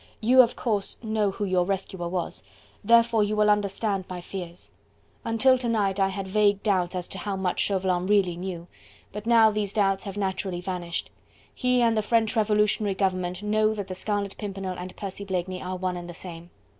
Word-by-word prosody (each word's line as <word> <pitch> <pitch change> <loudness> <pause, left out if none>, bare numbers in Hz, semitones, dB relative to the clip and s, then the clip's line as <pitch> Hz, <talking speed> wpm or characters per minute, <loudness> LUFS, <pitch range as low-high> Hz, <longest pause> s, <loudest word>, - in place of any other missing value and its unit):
"You 250 +4 +7
of 240 -1 +1
course 205 -5 -1
know 215 -2 +1
who 200 +1 -3
your 185 -2 +2
rescuer 190 -2 -3
was, 180 -1 -3 0.4
therefore 230 0 +5
you 210 +1 -1
will 210 0 +4
understand 200 -1 0
my 180 -1 -5
fears. 175 -1 -8 0.5
Until 255 +3 +3
to 240 -2 -1
night, 200 -3 +1
I 195 - +4
had 195 0 -4
vague 205 0 +2
doubts 185 -4 +1
as 180 -1 -3
to - - -7
how 205 -2 -3
much 190 -2 -1
Chauvelin 185 -2 +1
really 195 -4 +3
knew, 175 -1 -5 0.5
but 210 +2 -6
now 225 -2 +6
these 210 -2 -2
doubts 195 -3 +1
have 200 0 -6
naturally 190 -2 -2
vanished. 175 -2 -4 0.4
He 250 -1 +2
and 230 -1 +3
the 215 - +2
French 225 +2 +1
Revolutionary 210 -2 +2
Government 185 -1 -1
know 215 +1 +2
that 205 -2 -4
the 185 - -5
Scarlet 200 +1 -2
Pimpernel 195 -2 -4
and 180 +1 -7
Percy 200 0 -6
Blakeney 185 -1 -3
are 185 0 -4
one 185 0 -2
and 175 0 -7
the 175 - -8
same. 170 -1 -9
195 Hz, 195 wpm, -26 LUFS, 185-215 Hz, 0.5 s, You